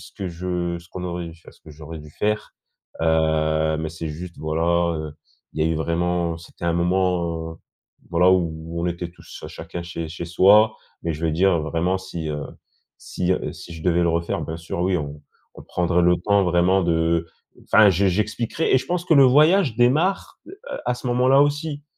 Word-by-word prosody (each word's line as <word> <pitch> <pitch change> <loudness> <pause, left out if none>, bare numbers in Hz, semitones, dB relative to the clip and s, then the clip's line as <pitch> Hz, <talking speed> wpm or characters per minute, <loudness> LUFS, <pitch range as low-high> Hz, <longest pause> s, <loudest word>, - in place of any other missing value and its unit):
ce - - -13
que 95 - -6
je 85 0 -3
ce 90 - -19
qu'on 90 -1 -7
aurait 85 -1 -4
dû 80 - -9
fai 85 - -25
enfin, - - -13
ce - - -24
que 80 - -14
j'aurais 80 +2 -9
dû 75 0 -13
faire, 105 +6 -2 0.5
heu, 80 -1 +2
mais 80 0 -3
c'est 80 0 -6
juste, 85 +3 -8
voilà, 85 +2 +1
heu, 75 -1 -6 0.4
il 80 - 0
y - - +2
a - - 0
eu 80 - 0
vraiment, 85 +1 -1
c'était 85 +1 -11
un 85 - +2
moment, 85 -2 0
heu, - - -13 0.5
voilà, 90 +2 +4
où 85 -2 -2
on - - 0
était 85 0 -3
tous - - -13
à - - -6
chacun 85 - -7
chez 85 -2 -5
chez 85 +1 -6
soi, 100 +5 +5 0.3
mais 85 - -1
je 80 +2 -5
veux 80 - +2
dire, 85 +1 +2
vraiment, 85 +4 -1
si, 85 -4 -6
heu, 75 -1 -3 0.6
si, 90 0 -3
heu, - - -3
si 85 - -11
je 80 - -9
devais 85 -1 +2
le 85 - +2
refaire, 85 0 -1
bien 80 - -5
sûr, 85 +1 -5
oui, 90 +1 +1
on 75 -2 -6 0.3
on - - -11
prendrait 90 0 0
le 90 0 +4
temps, 100 +3 +2
vraiment, 90 +1 +3
de 85 -1 +1 0.4
enfin, 105 -1 +6
je 95 +3 +2
j'expliquerais, 110 - 0
et - - +6
je 130 - -8
pense 175 +2 -2
que 165 - +3
le 140 -2 +7
voyage 150 - +4
démarre, 155 +11 +1
heu, 385 - -11 0.3
à 125 - 0
ce 125 - -8
moment-là 130 +3 +4
aussi. 145 0 -2
85 Hz, 215 wpm, -22 LUFS, 80-95 Hz, 0.6 s, le